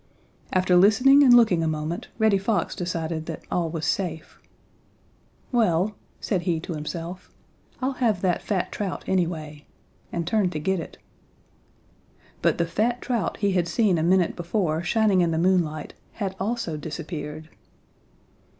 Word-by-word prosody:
After 185 -1 +3
listening 250 +10 +6
and 270 -3 +6
looking 225 -8 +6
a 165 - 0
moment 155 +2 -3
Reddy 220 -3 +3
Fox 200 -2 -1
decided 165 -2 -3
that 165 - -6
all 170 -2 0
was 160 -1 -4
safe. 160 -2 -3 1.1
"Well," 210 -5 +2 0.3
said 190 -5 -1
he 170 -2 0
to 175 - -5
himself, 165 +4 -6 0.5
"I'll 260 - +1
have 215 -7 +2
that 180 -3 +1
fat 195 -4 -2
trout 200 -3 -4
anyway," 160 -5 -2 0.4
and 170 -1 -2
turned 205 -4 +1
to 155 - -2
get 190 +4 0
it. 165 - -8 1.4
But - - +2
the 170 - +1
fat 220 +9 0
trout 240 -5 -2
he 200 -2 +1
had 180 -2 +1
seen 190 -2 +2
a - - 0
minute 180 +1 +2
before 175 -2 -1
shining 205 +1 +2
in 170 - +2
the 160 - -1
moonlight 165 -4 +1 0.2
had 195 -3 -4
also 210 -6 -2
disappeared. 155 0 -6
180 Hz, 150 wpm, -25 LUFS, 165-205 Hz, 1.4 s, listening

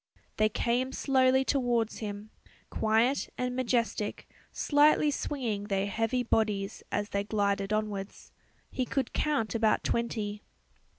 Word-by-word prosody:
They 215 0 +3
came 245 +4 0
slowly 265 -1 +3
towards 240 -5 0
him, 210 0 -6 0.4
quiet 225 +5 +2
and 250 0 -2
majestic, 235 -4 -1 0.2
slightly 295 0 +4
swinging 235 -8 -3
their 195 -2 0
heavy 225 +4 0
bodies 210 -4 0
as 205 0 -1
they 200 0 -1
glided 200 -1 0
onwards. 210 -2 -3 0.4
He 260 - -1
could 260 0 -2
count 285 -8 0
about 225 -2 +2
twenty. 215 -3 -2
225 Hz, 120 wpm, -29 LUFS, 205-255 Hz, 0.4 s, slightly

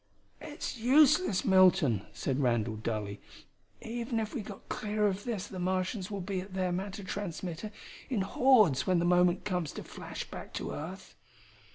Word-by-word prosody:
"It's 245 - -6
useless, 275 - +4
Milton," 180 - +4
said 135 -1 -2
Randall 120 -4 +1
dully. 105 -2 -4 0.6
"Even 230 0 -2
if 215 -1 -3
we 255 - -2
got 200 -1 -10
clear 210 0 -1
of 200 0 -1
this 215 -6 -2
the 190 -3 -7
Martians 185 +2 -1
will 200 -2 -4
be 185 0 -2
at 190 0 -10
their 185 -1 0
matter 195 +3 -4
transmitter 185 0 -5 0.4
in 240 -7 0
hordes 205 - +4
when 185 -1 +3
the 170 - +1
moment 180 0 +3
comes 180 -7 -1
to - - -6
flash - - -7
back - - -9
to - - -3
earth." 185 +6 -7
190 Hz, 165 wpm, -31 LUFS, 175-210 Hz, 0.6 s, useless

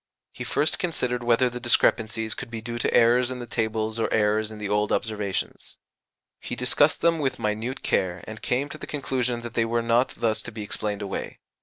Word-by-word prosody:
He - - -7
first 155 - +1
considered 125 -8 -1
whether 120 +2 +4
the 125 0 -4
discrepancies 110 -2 +2
could 125 - -7
be 115 -1 -5
due 120 +1 -5
to - - +1
errors 120 +2 +5
in 130 - -4
the 120 - -6
tables 110 -1 -1
or - - 0
errors 105 0 +2
in 110 - -9
the 105 -1 -4
old 105 +1 +1
observations. 105 -5 -2 0.6
He - - -5
discussed 135 +4 +3
them 165 -1 +3
with 135 -3 0
minute 110 +5 -2
care, 90 -1 0
and 110 0 -8
came 130 +3 0
to 155 - -8
the - - -7
conclusion 125 -4 -1
that 120 -1 -7
they 115 - +2
were 115 +1 0
not 115 +2 +2
thus 110 -2 +1
to - - -8
be 110 -1 -6
explained 105 0 -3
away. 100 - -4
115 Hz, 205 wpm, -26 LUFS, 110-125 Hz, 0.6 s, errors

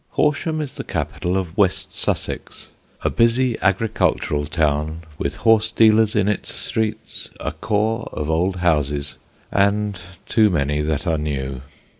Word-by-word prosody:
Horsham 155 +1 +1
is 145 -3 -6
the - - -4
capital 90 +2 -2
of 90 -3 -3
West 100 -4 +1
Sussex: - - -4 0.3
a - - +2
busy 120 +1 +3
agricultural 95 -7 +1
town 75 +1 0 0.2
with 70 - -2
horse 110 -1 +3
dealers 110 -1 +4
in 105 -2 +2
its 105 - -1
streets, 110 0 -3
a - - -3
core 110 +2 -1
of 75 - -4
old 85 +4 +1
houses, 75 -5 0 0.3
and 100 -1 +1 0.2
too 110 -2 +4
many 75 -4 0
that 75 +2 -1
are 80 -3 +1
new. 70 -3 -3
95 Hz, 140 wpm, -21 LUFS, 75-110 Hz, 0.3 s, dealers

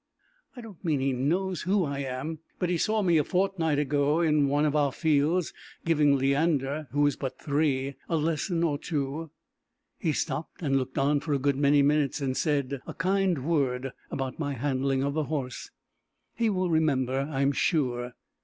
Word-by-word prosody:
"I 245 - -8
don't 215 -7 -12
mean 155 -5 +1
he 135 0 +1
knows 175 +8 0
who 190 0 +1
I 140 -1 -3
am, 140 +4 -4 0.2
but 180 - -1
he 180 - +1
saw 215 +2 +1
me 170 -4 +4
a - - +2
fortnight 180 -4 0
ago, 145 +2 +1
in 150 -4 +3
one 145 +2 +2
of 150 0 +1
our 145 -2 +2
fields, 155 +3 +1 0.3
giving 150 -4 +4
Leander, 140 +1 +1
who 145 +3 +2
is 145 - +2
but 135 -2 -5
three, 140 -2 0 0.2
a 165 - +1
lesson 165 +2 0
or 145 -4 0
two. 150 0 -3 0.7
He 165 - 0
stopped 150 +3 -3
and 135 -3 +1
looked 130 -1 -1
on 145 +2 +2
for 145 +1 -2
a - - +3
good 140 +1 +1
many 140 +1 +4
minutes, 145 -1 +2
and 135 -2 -1
said 140 -4 0
a - - -7
kind 185 -5 +1
word 135 -5 0 0.2
about 135 +1 -4
my 145 -3 -1
handling 135 +1 0
of 140 0 -1
the 155 0 -1
horse. 135 -5 -4 0.6
He 230 -1 +1
will 185 -3 0
remember, 135 -3 +1
I 135 -2 -1
am 140 - +3
sure." 125 -5 0
145 Hz, 185 wpm, -27 LUFS, 135-165 Hz, 0.7 s, me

